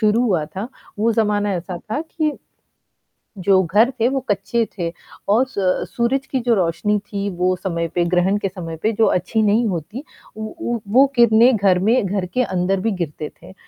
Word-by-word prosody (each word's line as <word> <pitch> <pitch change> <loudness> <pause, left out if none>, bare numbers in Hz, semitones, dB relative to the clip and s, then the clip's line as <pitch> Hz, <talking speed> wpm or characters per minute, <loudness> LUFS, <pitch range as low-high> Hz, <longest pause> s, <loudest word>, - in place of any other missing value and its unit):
शुरू 215 +1 +3
हुआ 185 -10 +1
था, 195 +8 -6 0.3
वो 225 +2 +2
ज़माना 210 -2 +1
ऐसा 180 +1 -5
था 220 - -4
कि 315 -1 -2 1.1
जो 190 0 +3
घर 210 +8 +3
थे, 230 - +3
वो 270 0 0
कच्चे 205 +3 0
थे 170 -2 -2 0.4
और 225 +6 +4
स 190 -7 0
सूरज 260 +3 0
की 265 - -1
जो 235 -1 +2
रोशनी 195 +3 +1
थी, 200 0 -4
वो 180 0 0
समय 170 -2 -3
पे 175 -1 +2
ग्रहण 185 +3 +3
के 195 - -2
समय 175 -4 -7
पे 220 - +2
जो 220 +1 +3
अच्छी 185 +5 +1
नहीं 215 +3 +3
होती, 200 - -5 0.3
उ 220 0 -5
उ 240 -3 -4
वो 265 +3 +7
किरणें 235 +1 +5
घर 195 -3 +3
में 220 +4 +2
घर 195 -1 -1
के 255 - +2
अंदर 185 -2 0
भी 225 - 0
गिरती 150 -1 -4
थीं। - - -16
205 Hz, 195 wpm, -20 LUFS, 185-235 Hz, 1.1 s, वो